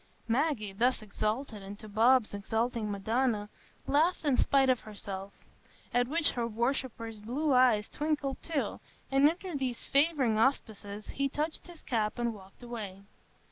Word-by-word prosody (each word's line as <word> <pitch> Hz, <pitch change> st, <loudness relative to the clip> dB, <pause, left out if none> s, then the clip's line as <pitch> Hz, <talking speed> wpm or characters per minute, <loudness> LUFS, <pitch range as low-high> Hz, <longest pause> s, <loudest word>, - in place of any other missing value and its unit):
Maggie, 235 Hz, -5 st, 0 dB
thus 240 Hz, +3 st, +1 dB
exalted 215 Hz, +2 st, -2 dB
into 200 Hz, +2 st, -9 dB
Bob's 225 Hz, +2 st, +4 dB
exalting 225 Hz, +2 st, -1 dB
Madonna, 215 Hz, +1 st, 0 dB, 0.4 s
laughed 315 Hz, +4 st, +2 dB
in 285 Hz, -3 st, +4 dB
spite 270 Hz, +1 st, +4 dB
of 255 Hz, -2 st, +3 dB
herself; 200 Hz, -2 st, -6 dB, 0.6 s
at 245 Hz, 0 st, +3 dB
which 310 Hz, +3 st, +2 dB
her 235 Hz, -1 st, -1 dB
worshipper's 235 Hz, -1 st, -2 dB
blue 270 Hz, +8 st, 0 dB
eyes 245 Hz, -5 st, +5 dB
twinkled 295 Hz, -3 st, -2 dB
too, 315 Hz, -4 st, -2 dB, 0.3 s
and 275 Hz, +2 st, +6 dB
under 355 Hz, +2 st, -5 dB
these 260 Hz, -4 st, -2 dB
favouring 275 Hz, -7 st, +3 dB
auspices 215 Hz, -5 st, -1 dB
he 275 Hz, 0 st, -1 dB
touched 305 Hz, +5 st, -3 dB
his 345 Hz, -3 st, -13 dB
cap 220 Hz, -3 st, -1 dB
and 240 Hz, -1 st, 0 dB
walked 195 Hz, +3 st, -14 dB
away. 210 Hz, -5 st, -6 dB
240 Hz, 140 wpm, -31 LUFS, 215-275 Hz, 0.6 s, and